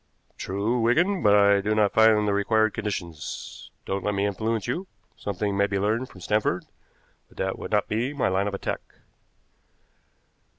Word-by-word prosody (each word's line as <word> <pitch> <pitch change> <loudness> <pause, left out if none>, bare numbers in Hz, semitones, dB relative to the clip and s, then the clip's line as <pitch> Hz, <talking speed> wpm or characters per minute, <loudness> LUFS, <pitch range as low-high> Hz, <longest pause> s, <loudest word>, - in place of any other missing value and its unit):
"True, 105 +6 -1
Wigan, 170 - +2
but 105 -1 +5
I 100 -1 +5
do 105 +2 0
not 105 -2 +2
find 110 -1 +5
the 100 - +2
required 110 +1 +2
conditions. 85 -7 -5 0.2
Don't 95 0 -2
let 105 -1 -1
me 100 +1 +1
influence 110 +2 -1
you. 170 +11 -3 0.3
Something 100 0 -3
may 100 0 +2
be 100 -1 -1
learned 110 +6 0
from 90 - -14
Stanford, 105 -2 0 0.6
but - - -23
that - - -2
would - - -6
not - - +1
be 115 +6 -1
my 145 -2 0
line 95 +2 +1
of 100 - -2
attack." - - -3
105 Hz, 170 wpm, -25 LUFS, 100-110 Hz, 0.6 s, but